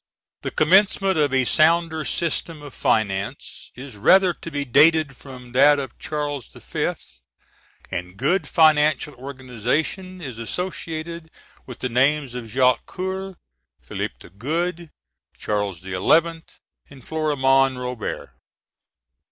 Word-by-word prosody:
The - - -3
commencement 190 +2 +3
of 145 -2 +2
a 130 -1 +2
sounder 160 +1 +2
System 165 -1 -2
of 145 -3 -10
finance 100 +3 -2
is 125 -3 -10
rather 185 - +5
to 165 - -9
be 145 -2 -3
dated 150 +2 +4
from 125 -2 -12
that 145 +4 +5
of 135 -3 -6
Charles 145 -4 -4
V.; - - -3 1.0
and 90 +2 -5
good 150 - +1
financial 155 -1 +3
organization 135 - -3
is 130 -9 -7
associated 165 - -5 0.4
with 125 - -8
the 125 - -1
names 135 +2 +1
of 125 -2 -6
Jacques 125 +2 +2
Coeur, 190 +1 -5 0.4
Philip - - -5
the - - -15
Good, 165 - -3 0.5
Charles 100 -5 -2
XI., 95 0 -7
and 155 - -1
Florimond 135 -4 +2
Robertet. 125 -2 -5
145 Hz, 120 wpm, -22 LUFS, 125-165 Hz, 1.0 s, rather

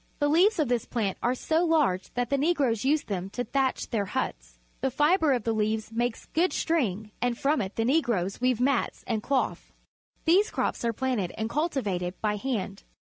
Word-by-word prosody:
The 290 - +1
leaves 370 +8 +4
of 305 -4 +2
this 240 -2 0
plant 210 -6 -2
are 245 +2 +1
so 320 +6 +1
large 300 - +1
that 245 0 -1
the 280 - +3
Negroes 275 -8 +1
use 290 +3 +2
them 190 -2 -4
to 245 - 0
thatch 265 +2 -1
their 215 -4 0
huts. - - -4 0.2
The 265 - 0
fibre 300 +4 +3
of 245 -4 +1
the 225 - 0
leaves 215 0 -1
makes 240 0 -2
good 350 +3 +1
string, 220 - -1
and 245 -1 0
from 290 0 +1
it 195 0 -5
the 225 - 0
Negroes 235 - +1
weave 250 -2 +2
mats 260 -1 0
and 220 -2 -1
cloth. 270 +4 -1 0.5
These 370 +6 +4
crops - - -2
are 235 - +2
planted 230 -6 -1
and 220 +1 -2
cultivated 205 - -1
by 210 -1 0
hand. 205 -5 -3
245 Hz, 195 wpm, -27 LUFS, 210-290 Hz, 0.5 s, leaves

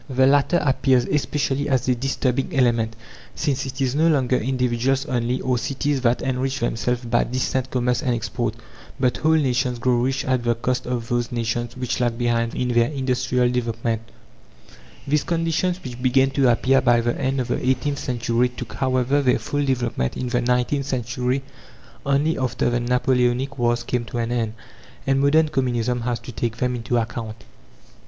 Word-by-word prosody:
The 130 0 +3
latter 145 +5 +4
appears 130 -2 +3
especially 145 -1 -1
as 130 -3 +1
a 130 - +4
disturbing 135 +4 -1
element, 115 -3 +2 0.4
since 140 -3 -1
it 135 +1 -7
is 130 -2 +1
no 155 +3 +3
longer 130 -5 +2
individuals 130 +2 0
only, 125 -2 -1
or 125 -2 0
cities, 140 +1 -1
that 120 -1 +1
enrich 130 +1 -1
themselves 120 +1 -1
by 120 0 +2
distant 130 +1 -1
commerce 125 -1 0
and 125 -2 0
export; 115 0 -2 0.4
but 125 -2 +1
whole 160 +1 +3
nations 130 -4 +1
grow 120 +1 +1
rich 130 +2 0
at 130 -2 0
the 120 0 +1
cost 125 +2 -2
of 120 -2 -2
those 120 -1 -1
nations 120 0 -2
which 125 0 -2
lag 120 -2 0
behind 115 -1 0
in 125 - -1
their 120 0 +3
industrial 125 -3 0
development. 115 -2 -1 1.1
These 145 +1 +2
conditions, 170 +2 0
which 125 -1 -7
began 130 +1 +3
to 135 -2 +3
appear 135 +3 +3
by 120 -1 +4
the 120 +1 0
end 135 +1 0
of 125 -1 -2
the - - -1
eighteenth 130 +3 0
century, 120 -1 0
took, 125 -2 -8
however, 130 +1 +1
their 130 -2 +3
full 145 0 -2
development 120 - -1
in 125 - -3
the 120 0 +1
nineteenth 125 +3 0
century 125 +1 -1 0.6
only, 145 +4 +2
after 125 -1 0
the 120 - +1
Napoleonic 125 +2 +1
wars 120 0 +1
came 120 0 -2
to 120 - -6
an 115 0 -1
end. 115 -3 -1 0.5
And 135 0 +2
modern 155 +3 +4
Communism 125 -4 0
has 120 0 -1
to - - -8
take 115 0 -3
them 125 +1 0
into 120 +1 -1
account. 115 -1 -4
125 Hz, 175 wpm, -22 LUFS, 120-135 Hz, 1.1 s, latter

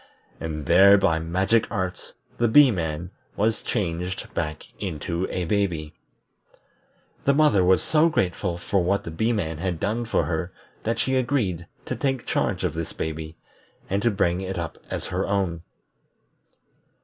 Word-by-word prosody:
And 75 -2 -4
there 95 +5 +7
by 80 -4 +2
magic 95 +7 +1
arts 95 -4 -4 0.2
the 120 - +4
Bee 135 +3 +7
man 85 -2 -3 0.2
was 110 +2 +1
changed 90 -4 -3
back 75 -1 -3
into 85 -1 -3
a 90 - -2
baby. 85 -5 -1 1.3
The 140 - +4
mother 140 -11 +4
was 95 +1 +4
so 160 +1 +4
grateful 90 - -1
for 90 +1 0
what 100 +3 +1
the 85 - -6
Bee 110 +9 0
man 80 -8 -2
had 90 -2 -2
done 115 +6 -1
for 115 - +1
her 85 +2 -2 0.3
that 115 +1 -1
she 130 - 0
agreed 120 - 0 0.2
to - - -3
take 135 -3 -1
charge 95 -2 0
of 90 -4 0
this 80 0 -4
baby, 80 0 -5 0.5
and 100 +1 +1
to 120 - +3
bring 95 -3 +1
it 95 0 -4
up 85 -3 -5
as - - -4
her 95 +2 -2
own. 95 -4 0
95 Hz, 160 wpm, -25 LUFS, 85-105 Hz, 1.3 s, there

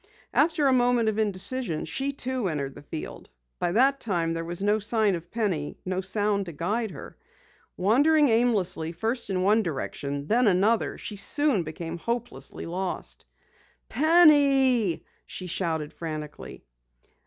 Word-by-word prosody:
After 305 -1 +3
a 270 - +4
moment 245 -2 +3
of 220 0 -2
indecision 205 -2 -3
she, 275 +1 -2
too, 260 -5 -2
entered 140 -5 -3
the - - -12
field. 155 +2 -8 0.3
By 175 - 0
that 270 +5 +4
time 170 -6 -1
there 165 0 -3
was 175 +3 -5
no 210 +1 +2
sign 215 -1 +2
of 170 -1 -6
Penny, 190 -11 -2
no 185 0 -1
sound 200 0 0
to 170 - -7
guide 210 +9 -2
her. 150 - -10 0.6
Wandering 290 +10 +4
aimlessly 215 -9 +1
first 225 +5 -2
in 185 -1 0
one 210 +3 +4
direction, 140 -4 -4
then 235 +8 +3
another, 205 +4 +2
she 210 - -7
soon 290 +1 +2
became 165 +1 -6
hopelessly 235 +4 -4
lost. 180 +2 -5 0.6
"Penny!" 275 - +4 0.2
she 185 - -7
shouted 160 -4 -2
frantically. 155 -3 -7
205 Hz, 140 wpm, -26 LUFS, 170-245 Hz, 0.6 s, a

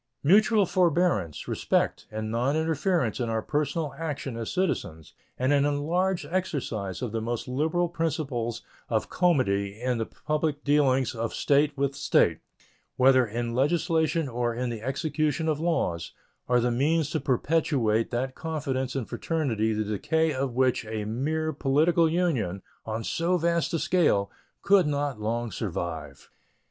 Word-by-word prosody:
Mutual 210 +6 +5
forbearance, 170 - +1
respect, - - 0
and 110 0 -4
noninterference 155 - 0
in 120 - -1
our 110 -1 -1
personal 150 0 -1
action 145 -6 -4
as 115 -1 -4
citizens 80 - -2 0.2
and 130 +3 +2
an 140 -1 +4
enlarged 170 +6 0
exercise 125 - -2
of 120 - -3
the 115 0 -2
most 115 +2 -3
liberal 160 +7 0
principles 150 -8 -2 0.3
of - - -1
comity 105 - +1
in 125 -1 -1
the 115 - -2
public 150 -1 -2
dealings 135 -3 +2
of 115 -1 -3
State 145 +1 +2
with 140 0 0
State, 140 -12 +2 0.6
whether 130 -1 +5
in 115 +2 -3
legislation 160 +3 +1
or 120 -1 -1
in 125 0 -2
the 115 -2 -5
execution 150 +4 -1
of 155 -2 0
laws, 90 - -1 0.4
are 125 0 +4
the 120 +1 +1
means 150 +5 +1
to 160 - 0
perpetuate 130 -5 +1
that 130 +2 -2
confidence 135 -5 -3
and 130 -5 -2
fraternity 120 -10 -1
the 110 0 0
decay 155 - 0
of 130 -2 -2
which 130 -1 +2
a 110 -1 -3
mere 155 +8 -1
political 160 +4 +3
union, 135 - 0 0.2
on 110 +1 -3
so 170 +7 0
vast 170 0 0
a 165 - +1
scale, 150 - +2 0.3
could 195 -4 +5
not 145 -5 -2
long 115 +2 -2
survive. 80 - -5
135 Hz, 145 wpm, -27 LUFS, 115-160 Hz, 0.6 s, Mutual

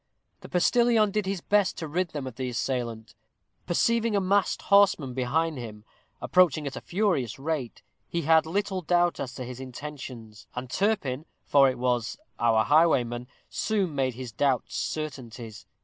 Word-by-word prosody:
The - - -12
postilion 225 +3 +3
did 210 -1 -1
his 195 -2 -2
best 205 +1 +2
to 160 - -4
rid 180 +5 0
them 145 -4 -5
of 130 - -6
the 130 0 -3
assailant. 120 -3 -3 0.5
Perceiving 230 +5 +2
a - - +4
masked 195 +1 +1
horseman 200 -10 +4
behind 145 +4 0
him, 110 -3 -8 0.3
approaching 165 -5 +3
at 140 - -4
a - - -6
furious 175 - 0
rate, 140 -4 -4 0.3
he 170 -1 -2
had 160 +1 +4
little 195 +2 -1
doubt 175 +1 +2
as 125 -2 -5
to 130 - -5
his 125 0 -8
intentions, 130 -5 -8
and 125 0 -5
Turpin, 165 -8 0 0.2
for 140 -2 +5
it 130 - -3
was 120 -2 -1 0.2
our 115 -2 +3
highwayman, 125 -6 +3 0.2
soon 200 -7 -1
made 130 -3 0
his 125 -1 -7
doubts 130 +2 0
certainties. 120 -7 -5
145 Hz, 160 wpm, -27 LUFS, 125-185 Hz, 0.5 s, for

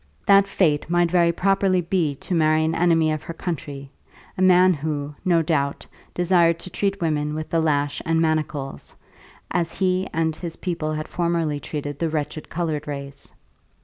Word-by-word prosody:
That 200 0 +6
fate 160 -6 +1
might 175 -1 +2
very 170 -2 +4
properly 195 +1 +2
be 165 -4 0
to 180 - -6
marry 155 -1 +3
an 160 - 0
enemy 165 -2 +3
of 155 -1 -2
her 165 +1 -8
country, 145 -6 -5 0.4
a - - -4
man 185 0 +6
who, 150 -1 -3
no 170 -3 +3
doubt, 140 -3 -1 0.3
desired 175 -2 +3
to 185 - -6
treat 200 -1 -1
women 150 -3 -1
with 155 0 -5
the 165 - +2
lash 145 -2 0
and 165 0 +1
manacles, 155 -4 -2 0.6
as 170 -2 -1
he 185 0 0
and 160 -1 0
his 165 0 -6
people 165 -4 -3
had 155 +1 -4
formerly 170 -4 -1
treated 145 -1 -5
the 165 - 0
wretched 150 0 -4
coloured 155 -3 -3
race. 140 -1 -7
165 Hz, 170 wpm, -23 LUFS, 150-175 Hz, 0.6 s, That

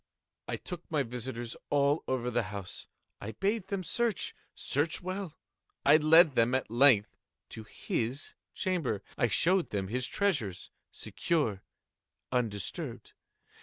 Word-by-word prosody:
I - - -1
took 175 -2 -8
my 150 -3 +1
visitors 120 -1 -5
all 145 +1 +2
over 125 -1 -1
the 120 +1 +2
house. 100 -3 -7 0.3
I 110 +2 -5
bade 200 0 -1
them 195 -1 -2
search—search 170 - -1
well. 185 -3 -4 0.5
I 145 +2 +8
led 160 0 +7
them, 120 +1 +3
at 130 -4 -2
length, 120 -4 +5 0.3
to 110 - -8
his 120 +6 -3 0.2
chamber. 165 - -1
I 120 - +2
showed 180 - +2
them 95 -2 -2
his 125 +3 0
treasures, 135 - -1 0.2
secure, 115 - -1 0.7
undisturbed. 115 -6 -2
135 Hz, 125 wpm, -31 LUFS, 115-170 Hz, 0.7 s, I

